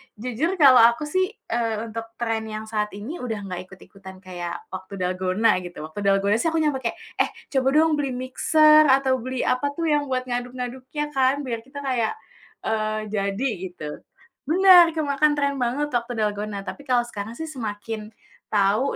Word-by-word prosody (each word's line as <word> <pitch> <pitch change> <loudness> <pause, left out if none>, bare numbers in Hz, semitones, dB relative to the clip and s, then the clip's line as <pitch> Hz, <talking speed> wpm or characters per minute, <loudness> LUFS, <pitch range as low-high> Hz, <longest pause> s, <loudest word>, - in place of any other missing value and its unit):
jujur 250 - -2
kalau 275 -6 +7
aku 235 +5 +5
sih, 370 +5 +1 0.2
eee, 225 -1 -1
untuk 225 0 -5
tren 225 -2 -2
yang 215 0 -5
saat 210 -2 -2
ini 245 +12 -6
udah 225 -5 -4
nggak 185 -1 -6
ikut-ikutan 190 0 -14
kayak 175 -2 -5 0.2
waktu 190 +1 -7
Dalgona 185 +3 +1
gitu. 175 -3 -8
Waktu 155 +6 -8
Dalgona 200 +2 +3
sih 330 - 0
aku 325 0 +1
nyampe 290 -3 +1
kayak, 235 -3 -3 0.2
"Eh - - +4 0.2
coba 265 -1 +1
dong 310 -1 +4
beli 275 -2 -1
mixer," 305 +4 +5
atau 265 -1 +3
beli 255 +1 -3
apa 255 +3 +1
tuh 335 - -3
yang 290 -1 +1
buat 255 -1 -1
ngaduk-ngaduknya 255 +4 -4
kan 270 +1 +2
biar 235 -3 -3
kita 270 +4 -10
kayak, 250 - 0 0.5
eee, 215 0 -1
jadi 200 +5 -1 0.2
gitu. 165 -4 -8 0.6
Bener, 355 0 +7
kemakan 295 -1 +2
tren 280 -1 0
banget 275 +5 -1
waktu 240 0 -1
Dalgona 205 -1 -3
tapi 285 - -8
kalau 245 -1 +3
sekarang 220 -1 -7
sih 320 +5 -6
semakin 215 -3 -5 0.4
tahu 210 +6 +2
240 Hz, 170 wpm, -24 LUFS, 210-280 Hz, 0.6 s, kalau